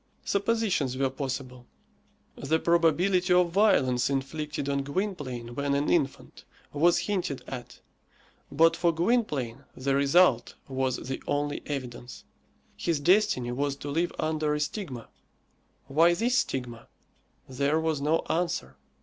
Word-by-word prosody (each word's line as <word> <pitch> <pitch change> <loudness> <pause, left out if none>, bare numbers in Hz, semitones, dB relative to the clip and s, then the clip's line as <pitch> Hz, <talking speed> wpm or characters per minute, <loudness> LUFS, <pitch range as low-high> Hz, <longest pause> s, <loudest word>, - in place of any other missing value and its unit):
Suppositions 200 - 0
were 135 -1 +1
possible. 130 -2 -5 0.7
The 155 +4 0
probability 170 +3 +2
of 180 -1 +3
violence 135 - +3
inflicted 140 +1 -3
on 140 0 0
Gwynplaine 140 - -4
when 140 +2 -1
an 145 +1 0
infant 145 -6 -1 0.3
was 165 +4 +4
hinted 180 -11 -2
at, 125 -2 -8 0.7
but 165 +1 +4
for 170 -1 +2
Gwynplaine 165 - -1
the 135 +1 -1
result 140 -3 +3
was 130 -1 -1
the 130 +1 -5
only 145 0 -1
evidence. 125 -3 -6 0.5
His 165 -4 -1
destiny 145 - +2
was 140 +2 -1
to 140 +1 -6
live 170 +4 0
under 155 -1 0
a - - -2
stigma. 145 - -4 0.8
Why 165 +6 +4
this 240 +6 +1
stigma? 120 -3 -4 0.6
There 140 +4 0
was 160 -3 -1
no 155 +3 +1
answer. 175 +1 -2
145 Hz, 125 wpm, -27 LUFS, 135-170 Hz, 0.8 s, was